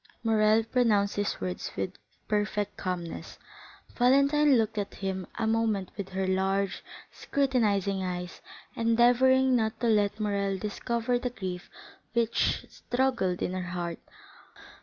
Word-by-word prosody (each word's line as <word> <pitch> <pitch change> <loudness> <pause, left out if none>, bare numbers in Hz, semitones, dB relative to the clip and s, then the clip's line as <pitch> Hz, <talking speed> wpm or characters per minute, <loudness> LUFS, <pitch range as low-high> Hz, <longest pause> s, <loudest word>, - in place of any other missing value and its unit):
Morrel 220 0 +4
pronounced 220 -4 +2
these 205 0 -1
words 90 -1 -4
with 95 -1 -2 0.3
perfect 210 -1 -1
calmness; 180 -2 -5 0.6
Valentine 280 +2 +4
looked 220 -1 0
at 200 - -4
him 190 -2 -4
a 225 - 0
moment 220 -4 0
with 200 -2 -5
her 190 0 -2
large, 190 +1 0 0.3
scrutinizing 210 -8 0
eyes, 180 -1 -5 0.3
endeavoring 245 +3 +4
not 220 -1 0
to 240 - -1
let 210 -2 +2
Morrel 200 -2 0
discover 235 +4 -1
the 250 - -2
grief 185 -6 -6 0.4
which 235 -1 +1
struggled 245 -8 -1
in 180 - -2
her 185 - -2 0.2
heart. 170 -1 -3
210 Hz, 125 wpm, -28 LUFS, 190-235 Hz, 0.6 s, Morrel